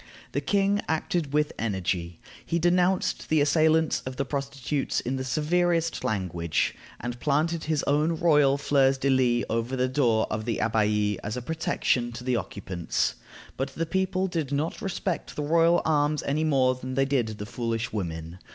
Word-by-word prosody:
The - - -1
king 200 0 +2
acted 160 -1 -1
with 150 +1 +1
energy. 90 -5 -2 0.2
He 170 - -1
denounced 180 +2 +1
the 155 - +3
assailants 155 +2 +3
of 130 0 -6
the 140 - -1
prostitutes 140 0 -2
in 130 +2 -2
the 130 - -3
severest 165 +5 +1
language, 90 -6 -1 0.3
and 120 0 -5
planted 155 +4 0
his 155 -1 0
own 150 +4 +2
royal 150 -5 +4
fleurs 135 -1 +3
de 135 +1 +1
lis 125 -2 +2
over 115 +3 -1
the 130 0 +1
door 125 -5 +2
of 110 0 -2
the 115 -2 -1
Abbaye 105 -2 +1
as 105 +3 -3
a - - -3
protection 160 -6 0
to 120 +1 -7
the 125 -1 +1
occupants. 95 -6 -2 0.4
But 135 +1 -3
the 165 - -1
people 190 +2 0
did 165 -7 -2
not 145 +3 -2
respect 190 -2 -3
the 150 - -2
royal 165 +3 +3
arms 150 -1 +1
any 150 +3 0
more 130 -4 +3
than 130 0 -6
they 135 +1 +3
did 135 -4 +1
the 105 - -5
"foolish 115 0 -3
women." 85 -3 -4
140 Hz, 170 wpm, -26 LUFS, 115-160 Hz, 0.4 s, royal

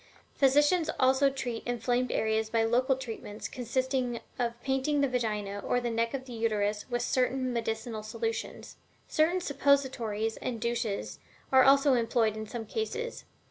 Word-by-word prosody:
Physicians 295 +5 +3
also 265 +1 +4
treat 255 -4 -4
inflamed 245 +1 0
areas 220 0 0
by 225 0 +2
local 250 +4 +2
treatments 225 -4 -6
consisting 255 0 -1 0.2
of 235 -1 -1
painting 270 +2 +1
the 280 - +3
Vagina 210 -5 -2
or 245 - 0
neck 230 +1 -1
of 260 -1 -5
the 250 - -9
Uterus 210 -2 -1
with 240 -1 -1
certain 255 0 0
medicinal 225 -1 -3
solutions. 450 - -4 0.3
Certain 330 +4 +2
suppositories 260 - +1
and 240 -3 -4
douches 230 -3 -2 0.3
are 265 -1 +7
also 275 +1 +5
employed 230 -2 +2
in 215 0 -6
some 230 0 -5
cases. 455 - -4
245 Hz, 140 wpm, -29 LUFS, 225-270 Hz, 0.3 s, are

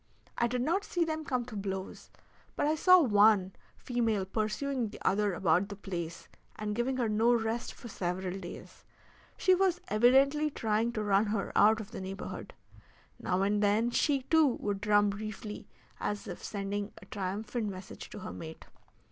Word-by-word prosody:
I 235 - +2
did 250 +1 -1
not 350 +8 +1
see 350 -4 0
them 315 -1 -3
come 250 -5 -1
to 240 -3 -9
blows, 195 -1 -5 0.5
but - - 0
I 300 - +3
saw 365 +4 +6
one 205 - +4 0.2
female 225 -5 0
pursuing 225 +5 -1
the - - -10
other 205 -1 +2
about 180 +3 +2
the 200 - -6
place, 170 -4 -6 0.3
and 210 0 -3
giving 250 +3 0
her 240 -3 +1
no 220 +3 +3
rest 225 +1 -2
for - - -10
several 185 -1 -3
days. 175 -2 -10 0.5
She 370 - +4
was 370 -1 +2
evidently 270 +7 +4
trying 225 -3 0
to 215 -3 -2
run 205 +1 +3
her 205 -1 -2
out 220 +2 +5
of 220 0 -8
the - - -6
neighborhood. 195 +1 -7 0.6
Now 185 +1 0
and 205 +1 +1
then 210 +4 +2
she, 275 +1 +1
too, 320 +2 +4
would 205 -6 -2
drum 205 -1 +4
briefly 210 0 -7 0.3
as 205 0 -3
if - - -7
sending 200 0 -3
a - - -14
triumphant 210 +4 -3
message 190 0 -9
to - - -8
her - - -6
mate. 160 -1 -9
215 Hz, 175 wpm, -31 LUFS, 200-245 Hz, 0.6 s, saw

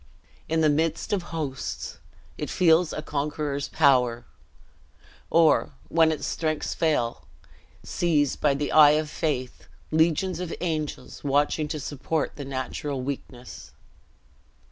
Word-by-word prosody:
In 160 0 +1
the 155 - +4
midst 160 +6 0
of 200 - +1
hosts, 150 -5 -5 0.4
it - - -5
feels 170 -1 +3
a 150 - -5
conqueror's 145 -1 -2
power; 125 -6 +3 1.0
or, 165 -3 +4 0.2
when 160 -1 +4
its 155 - -3
strength 155 -2 -2
fails, 150 -8 0 0.7
sees, 150 -5 +1
by 145 -2 +1
the 145 +1 -2
eye 150 -1 +7
of 155 -1 -3
faith, 130 -5 -3 0.2
legions 165 +3 +2
of 180 -2 -4
angels 155 -4 -4
watching 145 +2 +1
to 155 - -4
support 145 +3 -3
the 145 - -7
natural 135 0 -4
weakness. 125 -2 -7
150 Hz, 120 wpm, -26 LUFS, 140-160 Hz, 1.0 s, eye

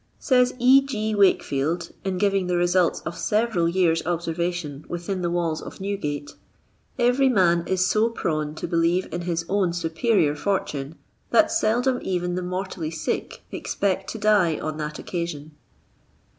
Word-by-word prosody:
Says 250 -2 +2
E. 255 +2 +6
G. 220 -6 -2
Wakefield, 170 -5 +1
in 190 -1 -2
giving 195 -1 +1
the 180 - 0
results 175 0 +2
of 165 - -5
severaJ 210 -5 0
years' 165 -3 +2
observation 170 -3 -2
within 175 +2 -4
the 175 - 0
walls 170 -2 -1
of - - -10
Newgate, 150 -8 -4 0.6
every 250 +2 +3
man 175 -7 +3
is 185 -1 +2
so 220 +4 +2
prone 155 -8 -2
to - - -5
believe 170 +2 +1
in 175 - -2
his 170 -1 -2
own 190 -3 +1
superior 165 -1 +1
fortune, 150 -4 -2 0.3
that 320 - +4
seldom 250 -4 +1
even 180 -1 -2
the 180 - -2
mortally 180 -2 -4
sick 160 -1 -4
expect 195 -1 -2
to - - -5
die 205 -6 +3
on 155 -1 -4
that 150 -1 -4
occasion. 170 -4 -5
180 Hz, 150 wpm, -24 LUFS, 165-205 Hz, 0.6 s, E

